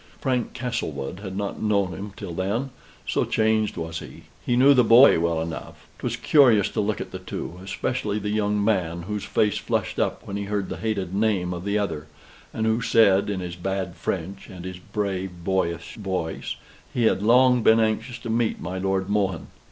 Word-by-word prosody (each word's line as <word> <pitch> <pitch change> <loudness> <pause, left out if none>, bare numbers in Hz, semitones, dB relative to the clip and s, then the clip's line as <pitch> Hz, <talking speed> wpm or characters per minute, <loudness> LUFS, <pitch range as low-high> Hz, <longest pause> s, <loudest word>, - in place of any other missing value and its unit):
Frank 125 -3 -1
Castlewood 90 - -3
had 95 -2 -6
not 100 -1 -3
known 100 -4 +1
him 100 +4 -6
till 85 - -6
then, 105 +10 -2 0.4
so - - +1
changed 110 -2 +1
was 80 0 -4
he. - - -11 0.2
He 120 - +1
knew 135 +3 +7
the 125 -2 +5
boy 120 -2 +7
well 85 -1 +1
enough. 80 0 -6
'Twas - - -2
curious 120 -9 +5
to - - -1
look 105 0 -1
at - - -6
the - - -6
two 90 - -6
especially 105 +2 -2
the 105 0 -2
young 105 -1 +1
man, 85 -6 0
whose 105 +2 -4
face 105 -1 +1
flushed - - -2
up - - -1
when 100 - -4
he 100 - -3
heard 100 -1 -2
the - - -4
hated 100 -5 -2
name 100 -4 +1
of 85 +1 -6
the 100 +1 +1
other; 85 -7 -2 0.4
and 110 - -2
who 110 +2 +2
said 105 -4 +4
in 95 -2 -2
his 90 -1 -5
bad 95 0 -3
French 95 +2 -4
and 90 -1 -9
his 95 -1 -6
brave 95 -3 -4
boyish 90 -2 -1
voice 95 -6 -3 0.4
"He 120 - 0
had 110 - +3
long 125 +3 +5
been 110 +1 +5
anxious 110 +2 0
to 115 - -5
meet 115 0 0
my 90 +2 -4
Lord 95 0 0
Mohun." 100 -4 -1
100 Hz, 195 wpm, -24 LUFS, 90-110 Hz, 0.4 s, knew